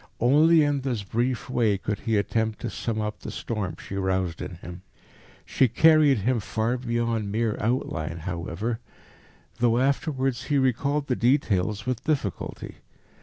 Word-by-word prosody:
Only 155 +6 +5
in 145 -1 +1
this 125 -6 -2
brief 120 +5 -1
way 115 -5 +1
could 100 +2 -3
he 110 -2 0
attempt 110 +1 0
to - - -3
sum 115 -2 -3
up 105 0 -3
the - - -7
storm 105 -6 -4
she - - -9
roused 95 -3 -1
in 90 - -6
him. 85 +1 -10 0.6
She 130 - +3
carried 155 +1 +5
him 115 +4 +1
far 110 +3 -1
beyond 115 -3 -1
mere 110 0 0
outline, 85 -9 -1
however, 90 +6 -4 0.8
though 120 -1 +3
afterwards 135 -1 0
he 145 - +1
recalled 140 +3 +1
the 130 - 0
details 110 -5 +1
with 125 -2 -2
difficulty. 135 - -3
115 Hz, 150 wpm, -26 LUFS, 100-130 Hz, 0.8 s, Only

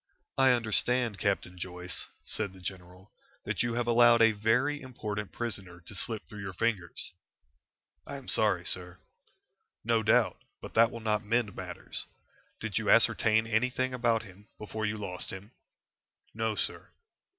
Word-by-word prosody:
"I 135 -1 +5
understand, 120 -2 +2
Captain 90 -3 -1
Joyce," 90 0 -3 0.2
said 100 -3 -2
the 95 - -14
general, 90 +1 -8 0.3
"that - - -1
you 120 0 0
have 120 0 0
allowed 120 0 +6
a 115 -1 +7
very 125 +8 +1
important 105 -5 -5
prisoner 100 -7 -5
to 85 - -10
slip 110 +2 +1
through 105 -1 -9
your 95 -2 -5
fingers." 95 -5 -1 0.9
"I - - -5
am - - -9
sorry, - - +2
sir." 90 0 -2 0.9
"No 115 +1 +2
doubt. 110 0 +3 0.2
But - - -9
that 115 0 +6
will 115 - -8
not 105 0 0
mend 110 -1 0
matters. - - -6 0.5
Did - - -2
you - - -2
ascertain 110 0 +5
anything 125 +3 0
about 120 -2 +1
him 100 0 -15
before 110 +1 -3
you 105 +1 -2
lost 90 -3 -4
him?" 95 +3 -8 0.8
"No, 110 0 -1
sir." - - -3
110 Hz, 150 wpm, -30 LUFS, 95-115 Hz, 0.9 s, a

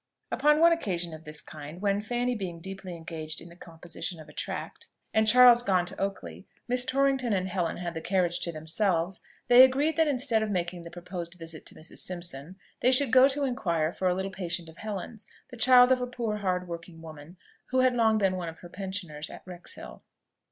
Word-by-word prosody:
Upon 300 +1 +3
one 335 +1 +7
occasion 180 - -3
of 155 0 -11
this 150 0 -5
kind, 155 +2 -10
when, 200 0 +1
Fanny 245 +3 -1
being 185 -7 -5
deeply 190 0 -7
engaged 160 -2 -6
in 170 - -11
the 170 - -14
composition 170 0 -8
of 155 - -12
a - - -14
tract, - - -5 0.3
and 220 0 +3
Charles 245 +1 +8
gone 185 -6 +2
to 180 - -7
Oakley, 90 - -5 0.2
Miss 250 0 +1
Torrington 270 -3 +1
and 185 -1 0
Helen 180 -3 -2
had 175 -1 -4
the 160 - -5
carriage 175 0 +1
to 170 - -2
themselves, 165 +3 -1 0.3
they 245 +1 +9
agreed 285 +4 +3
that 320 -1 +4
instead 255 -5 +1
of 220 - -1
making 175 -2 -2
the 170 - -9
proposed 175 0 -7
visit 165 -2 -9
to - - -9
Mrs. 155 - -9
Simpson, 175 -2 -6 0.2
they 250 - +4
should 265 +1 +3
go 255 +1 +8
to 280 +1 0
inquire 170 -11 -1
for 185 - -1
a 180 - +2
little 190 +1 -3
patient 175 -2 -4
of 160 - -15
Helen's, 215 0 -6 0.2
the 250 - -10
child 250 +2 +6
of 255 -1 +3
a 250 - -1
poor 235 -4 -3
hard 180 -3 -1
working 170 -1 -8
woman, 160 +2 -11 0.3
who 255 0 +2
had 255 -1 +4
long 225 -2 +3
been 195 -3 +2
one 175 -2 -4
of 160 - -11
her 175 - -11
pensioners 185 -5 -5
at - - -11
Wrexhill. 180 -1 -10
185 Hz, 210 wpm, -28 LUFS, 170-240 Hz, 0.3 s, they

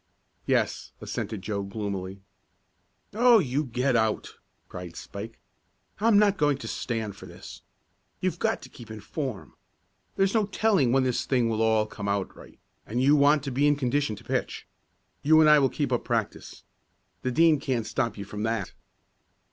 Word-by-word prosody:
"Yes," - - 0
assented 105 -2 -5
Joe 100 0 -2
gloomily. 100 -2 -5 0.9
"Oh, 240 +2 +6
you 145 - 0
get 125 0 0
out!" 110 -2 0 0.3
cried 90 -1 -8
Spike. 105 +7 -8 0.6
"I'm 220 0 +4
not 205 -2 +3
going 145 -2 +2
to 140 - -8
stand 110 -4 -3
for - - -12
this. - - -11 0.6
You've - - -2
got - - 0
to - - -11
keep 115 -2 -13
in 110 0 -7
form. 125 - -5 0.6
There's 195 0 +2
no 215 -3 +2
telling 200 - +2
when 135 +1 +3
this 125 -2 -1
thing 125 -4 +2
will 110 -1 -1
all 110 -1 +3
come 105 -1 -7
out 100 -1 -2
right, - - -15 0.3
and 120 +4 -2
you 140 +3 +5
want 145 0 +4
to 140 - -4
be 140 +4 +2
in 145 - +4
condition 135 -3 0
to - - -14
pitch. - - -3 0.6
You 155 +2 +5
and 155 - +6
I 150 0 +7
will 135 -2 +3
keep - - -2
up - - 0
practice. - - -3 0.6
The 130 - -1
Dean 160 +3 +4
can't 130 -5 -2
stop 115 -4 -2
you 100 - -6
from 105 +1 -7
that." 110 -3 -2
125 Hz, 175 wpm, -27 LUFS, 110-145 Hz, 0.9 s, I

